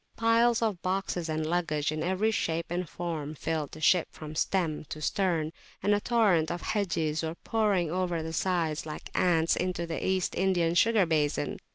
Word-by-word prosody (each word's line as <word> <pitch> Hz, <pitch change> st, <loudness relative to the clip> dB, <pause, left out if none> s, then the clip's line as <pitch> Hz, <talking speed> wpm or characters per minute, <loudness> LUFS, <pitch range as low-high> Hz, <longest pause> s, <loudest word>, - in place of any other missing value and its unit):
Piles 230 Hz, +1 st, +3 dB
of 205 Hz, -6 st, -1 dB
boxes 185 Hz, -3 st, -2 dB
and 155 Hz, 0 st, -1 dB
luggage 155 Hz, -3 st, 0 dB
in 155 Hz, 0 st, -3 dB
every 190 Hz, +6 st, +1 dB
shape 165 Hz, -5 st, -1 dB
and 175 Hz, -1 st, -2 dB
form 155 Hz, -3 st, -4 dB
filled 155 Hz, -1 st, -3 dB
the -, -, -8 dB
ship 170 Hz, +3 st, +4 dB
from 155 Hz, -1 st, -9 dB
stem 160 Hz, -2 st, 0 dB
to 155 Hz, -, -7 dB
stern, 165 Hz, -2 st, 0 dB, 0.3 s
and 205 Hz, -, +3 dB
a 205 Hz, -, +3 dB
torrent 200 Hz, -10 st, +3 dB
of 175 Hz, 0 st, -4 dB
Hajis 165 Hz, -7 st, 0 dB
were 160 Hz, 0 st, -3 dB
pouring 200 Hz, -6 st, 0 dB
over 175 Hz, -2 st, -1 dB
the 160 Hz, 0 st, -5 dB
sides 165 Hz, -4 st, 0 dB
like 155 Hz, -, -7 dB
ants 165 Hz, -2 st, +3 dB
into 180 Hz, -2 st, -1 dB
the 165 Hz, -1 st, -4 dB
East 190 Hz, -1 st, 0 dB
Indian 175 Hz, -3 st, +1 dB
sugar 215 Hz, +2 st, +4 dB
basin. 155 Hz, -3 st, 0 dB
170 Hz, 180 wpm, -29 LUFS, 160-190 Hz, 0.3 s, ship